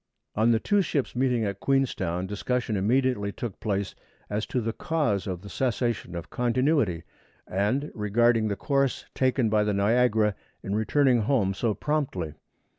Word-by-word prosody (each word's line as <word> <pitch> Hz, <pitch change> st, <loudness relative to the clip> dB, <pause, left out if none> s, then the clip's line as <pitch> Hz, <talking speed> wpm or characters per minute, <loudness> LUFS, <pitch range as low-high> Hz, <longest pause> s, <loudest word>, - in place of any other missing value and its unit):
On 110 Hz, +2 st, +2 dB
the 115 Hz, -1 st, +4 dB
two 205 Hz, -, +2 dB
ships 145 Hz, -9 st, -2 dB
meeting 125 Hz, -3 st, +1 dB
at 100 Hz, -1 st, -3 dB
Queenstown, 95 Hz, -11 st, 0 dB
discussion 110 Hz, +3 st, -2 dB
immediately 105 Hz, 0 st, +1 dB
took 110 Hz, -1 st, -6 dB
place 100 Hz, -2 st, -2 dB, 0.4 s
(1) 105 Hz, -, -2 dB
as 110 Hz, -, -1 dB
to 125 Hz, -, -1 dB
the 115 Hz, -1 st, -2 dB
cause 140 Hz, -13 st, -1 dB
of 90 Hz, -1 st, -4 dB
the -, -, -9 dB
cessation 120 Hz, -6 st, -1 dB
of 85 Hz, -, -7 dB
"continuity"; 125 Hz, -, +1 dB, 0.4 s
and 105 Hz, +9 st, 0 dB
(2) 150 Hz, -, -7 dB
regarding 110 Hz, +2 st, +2 dB
the 100 Hz, -, -1 dB
course 140 Hz, +2 st, 0 dB
taken 130 Hz, -2 st, +2 dB
by 105 Hz, -1 st, +2 dB
the 105 Hz, -1 st, 0 dB
Niagara 110 Hz, 0 st, +3 dB, 0.3 s
in 100 Hz, -, -3 dB
returning 125 Hz, +4 st, +3 dB
home 105 Hz, -4 st, +1 dB
so 110 Hz, +1 st, -1 dB
promptly. 135 Hz, -, -2 dB
115 Hz, 165 wpm, -26 LUFS, 100-130 Hz, 0.4 s, the